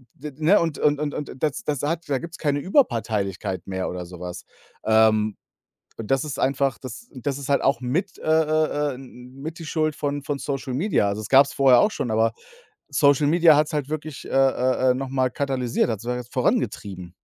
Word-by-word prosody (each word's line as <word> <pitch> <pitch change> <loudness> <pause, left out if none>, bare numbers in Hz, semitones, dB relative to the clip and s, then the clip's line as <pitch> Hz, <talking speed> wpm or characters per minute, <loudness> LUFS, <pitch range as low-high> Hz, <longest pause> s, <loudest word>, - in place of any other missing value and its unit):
d 150 - -8
ne? 160 +7 +4
Und 165 -4 -1
und 145 -1 +2
und 150 -1 -2
und 150 - -5
das 150 -3 -1
das 145 -3 -2
hat 165 +1 -2
da 140 - +1
gibt's 170 +2 -8
keine 145 -2 0
Überparteilichkeit 105 - 0
mehr 95 -1 -3
oder 90 0 -5
sowas. 90 0 -8 0.4
Ähm, 110 -1 +3 0.6
und 110 -2 -7
das 135 +1 +2
ist 145 -3 -5
einfach 135 -3 +1
das 130 - -9
und 130 +1 -12
das 140 -1 -1
ist 140 - -7
halt 140 - +2
auch 135 -3 +2
mit 160 +10 -2
äh, - - -13
äh, 155 -2 +1
äh, - - -6
n 135 +2 -10
n 125 0 -14
mit 160 +2 -6
die 165 - -8
Schuld 155 -1 0
von 145 -1 -3
von 140 0 -3
Social 135 -2 -4
Media. 155 - +1
Also 100 +1 -3
das 110 - -7
gab's 140 +1 +5
vorher 130 -3 +5
auch 210 - +3
schon, 125 - -3
aber 110 +1 +2 0.6
Social 145 0 +3
Media 165 0 +6
hat's 150 +2 +1
halt 145 -3 -2
wirklich, 155 -1 -6
äh, - - -9
äh, 130 -1 +2
äh, - - +3
noch 135 +1 -4
mal 130 -1 0
katalysiert, 130 -3 -1
hat's 110 -1 -4
halt 125 +1 -2
jetzt 120 - -21
vorangetrieben. 100 -8 -2
135 Hz, 215 wpm, -23 LUFS, 115-150 Hz, 0.6 s, Media